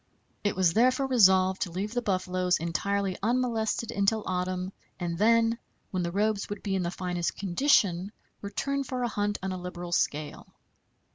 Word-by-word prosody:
It 205 - 0
was 180 -3 +3
therefore 255 +5 +3
resolved 190 -7 +4
to 180 - 0
leave 200 +5 -3
the 245 - 0
buffaloes 185 -3 0
entirely 190 +4 -1
unmolested 230 -1 0
until 205 +2 +1
autumn, 185 +1 -2 0.3
and 175 -2 -2
then, 230 +4 +3 0.3
when 185 - -1
the 170 -1 -2
robes 205 +2 0
would 205 -1 -6
be 200 - -1
in 190 - 0
the 170 - -1
finest 175 -1 -2
condition, 195 -2 +2 0.3
return 275 +7 -2
for 255 -1 -3
a - - +1
hunt 205 -2 -1
on 190 - -2
a 185 -1 -5
liberal 175 -1 -6
scale. 150 -3 -1
195 Hz, 165 wpm, -28 LUFS, 180-220 Hz, 0.3 s, resolved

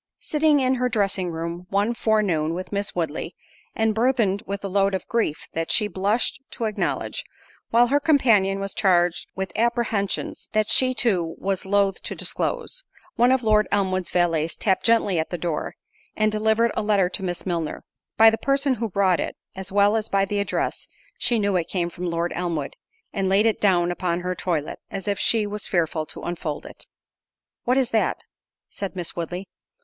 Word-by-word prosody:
Sitting 300 -1 +3
in 260 -1 +2
her 250 - +2
dressing 195 -5 0
room 170 +2 -5
one 205 +4 +1
forenoon 195 -9 +1
with 185 +1 -6
Miss 200 0 -3
Woodley, 165 0 -3 0.4
and 220 0 +2
burthened 225 -4 +2
with 200 0 -4
a - - -2
load 195 0 +2
of 190 - -5
grief 225 -10 -1
that 165 0 -2
she 210 - +3
blushed 210 +7 0
to 230 - -4
acknowledge, 215 -2 -2 0.5
while 235 +1 +5
her 285 +2 +3
companion 225 -10 +3
was 195 -1 -3
charged 175 -2 +2
with 190 0 -3
apprehensions 230 -4 -1
that 215 -1 +1
she 255 -1 +4
too 180 -10 +1
was 195 -1 -2
loath 200 -1 +2
to - - -4
disclose, - - -1 0.3
one 245 +2 +4
of 260 -1 +2
Lord 215 -1 +3
Elmwood's 185 -2 0
valets 165 -2 +1
tapped 190 -3 0
gently 215 -6 +3
at 160 - -2
the 175 - -3
door, 165 -2 -3 0.4
and 215 0 +2
delivered 220 +2 +2
a - - 0
letter 205 -3 +2
to 195 - -4
Miss 175 -2 -3
Milner. 170 -4 -3 0.3
By 225 0 +8
the 225 - -2
person 275 0 +2
who 230 - -1
brought 190 -2 +2
it, - - -3 0.2
as 190 0 -6
well 205 +2 +4
as 220 0 -1
by 195 0 +2
the 205 +1 -2
address, 200 - -2 0.3
she 240 -1 +2
knew 200 -2 +1
it 170 - -1
came 175 -2 -1
from 175 +1 -4
Lord 170 +1 -1
Elmwood, 170 -5 -3 0.4
and 195 -2 0
laid 200 +3 +4
it 225 - +1
down 175 -3 +3
upon 175 -1 -1
her 180 +1 -2
toilet, 170 -5 -2
as 195 -3 -5
if 200 -1 0
she 225 -2 +3
was 210 +1 -4
fearful 160 -4 0
to - - -8
unfold 160 -4 -4
it. - - -11 0.8
"What 250 +2 +2
is 260 -3 +1
that?" 220 - +1 0.5
said 195 -1 -6
Miss 175 -3 -3
Woodley. 175 +3 -4
195 Hz, 185 wpm, -24 LUFS, 175-220 Hz, 0.8 s, By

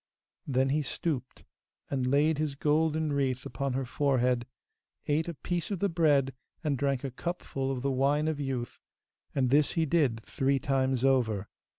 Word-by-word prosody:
Then 135 -1 +2
he 150 +3 +2
stooped 140 -2 -3 0.5
and 130 -2 0
laid 145 +3 +3
his 150 -3 -1
golden 155 +1 +1
wreath 130 -2 0
upon 135 +3 -2
her 135 +1 -1
forehead, 125 -2 +1 0.6
ate 155 +3 +1
a 170 - -4
piece 175 +3 -3
of 200 - -1
the 200 +3 +1
bread 145 -6 +3 0.3
and 150 -3 +1
drank 135 0 0
a 135 - -3
cupful 135 -2 -3
of 130 -2 -3
the 140 - +1
wine 140 +4 +2
of 155 -2 -1
youth, 130 -4 -3 0.6
and 130 -3 +2
this 145 +1 +4
he 165 -1 +1
did 135 -8 +1
three 135 +1 +1
times 130 -1 +1
over. 110 -7 +2
140 Hz, 170 wpm, -29 LUFS, 130-150 Hz, 0.6 s, this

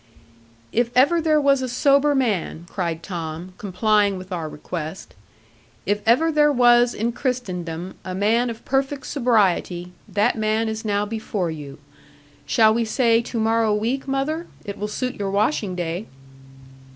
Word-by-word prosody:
'If 235 +1 +1
ever 330 +6 +5
there 310 -1 +3
was 280 -2 +3
a 255 - -2
sober 280 +3 +3
man,' 205 -10 -1
cried 170 -4 -3
Tom, 170 0 -6
complying 205 0 +1
with 185 +1 -10
our 165 -3 -3
request; 160 +3 -7 0.7
'if 205 +1 0
ever 315 +8 +4
there 295 -1 +4
was 240 -2 +4
in 230 +3 -1
Christendom 185 - -3
a 185 -1 -5
man 225 +5 +2
of 230 -1 -8
perfect 270 +1 -1
sobriety, 195 - +1 0.2
that 205 +1 +2
man 220 0 0
is 220 0 -4
now 205 -1 0
before 210 -5 -3
you. 145 -3 -8 0.7
Shall 220 -2 +5
we 235 +1 +1
say 230 0 +2
to 235 0 -4
morrow 225 -1 +2
week, 240 +6 -2
mother? 290 +5 -2 0.2
It 200 0 -6
will 210 - -2
suit 250 +4 -3
your 200 -1 -1
washing 205 -1 0
day.' 175 +3 -3
220 Hz, 150 wpm, -22 LUFS, 185-250 Hz, 0.7 s, ever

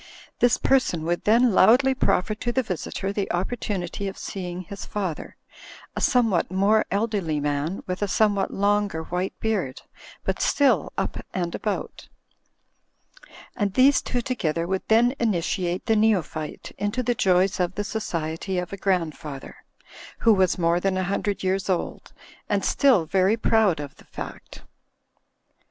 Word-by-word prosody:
This 245 -1 +4
person 255 -12 +1
would 175 +2 -2
then 230 +1 +4
loudly 250 +8 +5
proffer 215 -5 +1
to 240 +3 -3
the 260 +2 +1
visitor 195 0 -4
the 200 -1 -2
opportunity 190 0 -3
of 195 - -6
seeing 180 -2 -5
his 200 +3 -8
father, 190 -7 -4 0.6
a - - -3
somewhat 225 -10 +2
more 200 +4 +3
elderly 200 -7 -1
man, 145 +5 -2
with 185 +1 -4
a 205 - +1
somewhat 200 +1 +1
longer 200 -4 0
white 180 +3 -3
beard, 195 -12 -2 0.4
but - - -2
still 285 -2 +2
"up - - -2 0.2
and 175 -2 -2
about.*' 210 -2 -4 1.5
And 205 -4 -1
these 270 +2 +5
two 245 - -2
together 170 - -1
would 190 +2 -1
then 235 +3 +4
initiate 180 -4 -1
the 225 - +2
neophyte 190 -8 0
into 205 +5 -1
the 245 - +1
joys 185 -3 +2
of 180 0 0
the 205 - -2
society 175 -3 -3
of 180 +1 -3
a - - -4
grandfather, 160 -7 -2 0.7
who 225 - +6
was 190 -3 +2
more 170 0 +2
than 190 +1 0
a 185 - 0
hundred 200 +2 -2
years 190 +1 -1
old, 180 -2 -2 0.4
and - - 0
still 250 - +4
very 190 +6 +2
proud 220 -7 +2
of 145 -1 -7
the - - -18
fact. - - -9
195 Hz, 150 wpm, -24 LUFS, 175-220 Hz, 1.5 s, who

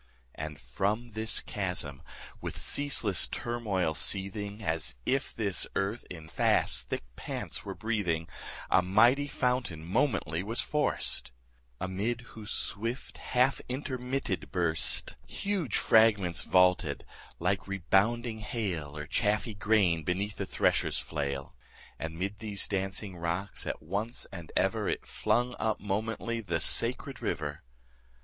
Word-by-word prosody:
And 75 -2 -6
from 100 - -1
this 110 0 0
chasm, 90 -8 -2 0.4
with - - -4
ceaseless 125 - +3
turmoil 105 -9 -1
seething, 100 +5 0
As 80 -7 0
if 135 +1 +1
this 100 -5 0
earth 100 +5 -1
in 80 -3 -8
fast - - +2
thick - - -2
pants - - -4
were - - -4
breathing, 100 -8 -1 0.4
A - - +6
mighty 120 +10 +5
fountain 125 - -1
momently 90 - +1
was 110 +5 -1
forced; 150 - +1 0.5
Amid 100 +6 -1
whose 110 -1 -8
swift 115 +5 -3
half 125 +2 +2
intermitted 125 - -2
burst 85 -3 0
20 - - -15
Huge 195 - 0
fragments 105 -6 +5
vaulted 90 -5 +3 0.3
like 95 +4 0
rebounding 110 +5 +2
hail, 90 -10 -3
Or 75 - -4
chaffy 105 +6 +1
grain 100 -5 +3
beneath 100 +5 -1
the - - -3
thresher's - - +2
flail: 70 -3 -3 0.4
And 80 +1 -4
'mid 100 +3 -3
these 105 -3 0
dancing 95 -1 -2
rocks 85 +4 -2
at - - -3
once 100 +8 -2
and 85 -4 -8
ever - - +2
It - - -2
flung 125 +1 +1
up 110 -1 0
momently 110 +3 -2
the 85 -6 -1
sacred - - +1
river. 75 -1 -2
100 Hz, 125 wpm, -30 LUFS, 85-115 Hz, 0.5 s, A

